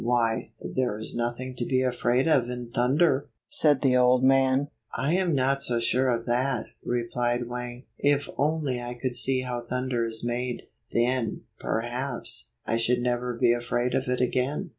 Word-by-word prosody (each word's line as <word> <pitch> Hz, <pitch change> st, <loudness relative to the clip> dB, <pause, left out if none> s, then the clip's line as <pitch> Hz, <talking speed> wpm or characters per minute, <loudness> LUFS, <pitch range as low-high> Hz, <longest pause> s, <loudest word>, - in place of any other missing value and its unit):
"Why, 115 Hz, -2 st, +1 dB
there 125 Hz, -5 st, -2 dB
is 110 Hz, -, -5 dB
nothing 120 Hz, +2 st, -3 dB
to 120 Hz, -, -1 dB
be 130 Hz, +1 st, +1 dB
afraid 125 Hz, +2 st, +1 dB
of 130 Hz, -7 st, +3 dB
in 125 Hz, -1 st, -6 dB
thunder!" 135 Hz, +4 st, +2 dB, 0.2 s
said 145 Hz, -4 st, +3 dB
the 130 Hz, -3 st, +3 dB
old 125 Hz, 0 st, +4 dB
man. 135 Hz, +1 st, +4 dB, 0.3 s
"I 135 Hz, +7 st, 0 dB
am 180 Hz, -4 st, +2 dB
not 135 Hz, +1 st, +1 dB
so 120 Hz, -3 st, +1 dB
sure 130 Hz, +3 st, +2 dB
of 115 Hz, -1 st, 0 dB
that," 125 Hz, +1 st, 0 dB, 0.2 s
replied 120 Hz, 0 st, -1 dB
Wang. 125 Hz, +1 st, -6 dB, 0.2 s
"If 145 Hz, 0 st, +2 dB
only 145 Hz, -4 st, 0 dB
I 120 Hz, 0 st, -5 dB
could 125 Hz, 0 st, -3 dB
see 130 Hz, +1 st, +1 dB
how 125 Hz, -1 st, -3 dB
thunder 125 Hz, 0 st, -1 dB
is 115 Hz, -1 st, -1 dB
made, 120 Hz, +1 st, -2 dB, 0.3 s
then, 120 Hz, -1 st, 0 dB, 0.2 s
perhaps, 120 Hz, +3 st, -2 dB, 0.2 s
I 115 Hz, -, 0 dB
should 120 Hz, +1 st, +1 dB
never 125 Hz, 0 st, -1 dB
be 120 Hz, 0 st, +4 dB
afraid 120 Hz, +1 st, -1 dB
of 130 Hz, -, 0 dB
it 125 Hz, 0 st, 0 dB
again." 130 Hz, +8 st, 0 dB
125 Hz, 170 wpm, -27 LUFS, 120-130 Hz, 0.3 s, old